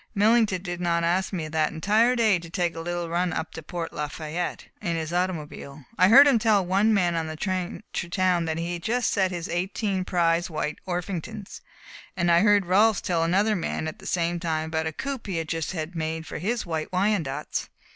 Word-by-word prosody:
Millington 210 -3 +3
did 175 -1 -5
not 170 -1 +1
ask 180 +3 +1
me, 170 -5 -3
that 155 0 0
entire 215 +9 +3
day, 220 -6 +3
to 165 0 -10
take 175 -1 -1
a - - -5
little 175 0 -3
run 175 +2 0
up 160 0 -3
to 160 - -7
Port 165 +1 -5
Lafayette 155 +3 -4 0.2
in 170 -1 -1
his 160 0 -3
automobile. 155 -6 -3
I 185 +2 +5
heard 265 +7 +9
him 265 -5 +4
tell 210 -4 +3
one 195 +5 +3
man 180 -5 +2
on 165 -1 -1
the 155 - -5
train 185 +3 -3
to 170 - -3
town 180 -2 +1
that 160 0 -2
he 170 +1 -2
had 170 - -5
just 240 +6 0
set 190 -2 +2
his 175 -2 -4
eighteen 185 +2 -1
prize 170 -1 +1
White 155 -1 -3
Orpingtons, 185 +3 -5 0.6
and 175 -1 +2
I 170 - +6
heard 205 0 +4
Rolfs 205 +3 +4
tell 170 -2 0
another 200 +6 +2
man, 165 -3 -2
at 155 - -6
the - - -9
same 175 0 0
time, 160 -2 -2
about 160 0 -1
a - - -2
coop 270 - -5
he 185 -4 -2
had 165 -1 -2
just 165 +2 -2
had 165 0 -5
made 160 0 -3
for - - -6
his 230 +5 -1
White 160 -2 -3
Wyandottes. 180 -7 -1
175 Hz, 215 wpm, -25 LUFS, 165-195 Hz, 0.6 s, heard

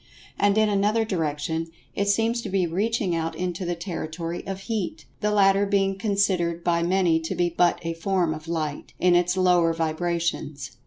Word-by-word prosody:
And, 205 0 +3
in 215 0 +4
another 210 +2 +2
direction, 160 -3 -2 0.3
it 200 - -1
seems 225 +3 +2
to - - -5
be 190 -1 +1
reaching 195 +1 0
out 165 0 -2
into 180 +1 -3
the 175 0 -1
territory 165 -1 -5
of 195 0 -4
Heat, 215 -3 -3
the 210 - 0
latter 200 -1 +4
being 195 -1 +1
considered 190 -4 0
by 170 -1 +2
many 175 -2 +2
to 160 - -4
be 175 0 +1
but 175 0 +2
a 165 0 -2
form 175 -1 0
of 155 +1 -9
Light, 155 -3 -3
in 180 0 +4
its 180 +1 +2
lower 180 -3 +4
vibrations. 165 -3 -2
175 Hz, 175 wpm, -25 LUFS, 165-195 Hz, 0.3 s, in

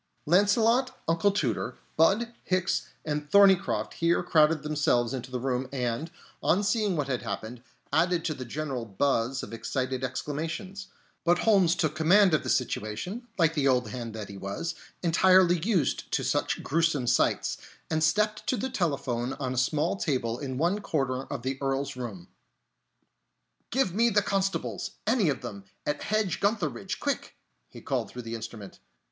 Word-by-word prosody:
Launcelot, 220 - +3
Uncle 165 +5 +3
Tooter, 130 - -1 0.2
Budd, 215 +9 +3
Hicks 185 0 0 0.2
and 150 -1 -3
Thorneycroft 195 0 +4
here 170 +1 +1
crowded 155 -3 +3
themselves 140 -5 +1
into 130 -1 -5
the 125 -1 -3
room 130 0 -2
and, 125 +3 -2 0.3
on 195 +5 +2
seeing 210 -2 +1
what 145 -2 -1
had 130 -3 -1
happened, 115 +2 -5 0.3
added 170 +1 +2
to 155 - 0
the 130 - -7
general 135 0 -4
buzz 120 +3 0
of - - -8
excited 130 +3 -2
exclamations; 165 - -4 0.4
but 175 +1 +4
Holmes 190 -6 +4
took 155 -4 0
command 180 +4 +5
of 155 - +3
the - - -5
situation, 125 - -2
like 165 -3 +3
the 145 -3 +1
old 125 -4 +2
hand 115 -2 -6
that 105 -2 -5
he 100 - -9
was, 100 - -4 0.3
entirely 180 +1 +5
used 185 -2 0
to - - +1
such - - 0
gruesome 160 -4 +1
sights, 120 0 +1 0.3
and 160 -1 0
stepped 210 +6 +1
to 255 - +1
the 260 +5 -3
telephone 135 - -1
on 130 -2 -3
a - - -5
small 155 +7 +1
table 125 -8 -1
in 130 -3 -4
one 175 +8 +1
corner 135 -8 -1
of 140 -4 -6
the 130 +1 -2
Earl's 135 0 -1
room. 105 -8 -7 1.4
"Give 245 -8 +1
me 230 +4 +3
the - - -4
village - - -10
constables, 195 0 -1
any 220 -6 +3
of 140 - -2
them, 100 -5 -7 0.2
at 150 - -1
Hedge 215 -4 0
gutheridge, 200 -7 -1
quick!" - - -2 0.3
he - - -12
called - - -2
through 125 - -8
the 115 0 -6
instrument. 110 -3 -8
150 Hz, 165 wpm, -28 LUFS, 125-185 Hz, 1.4 s, command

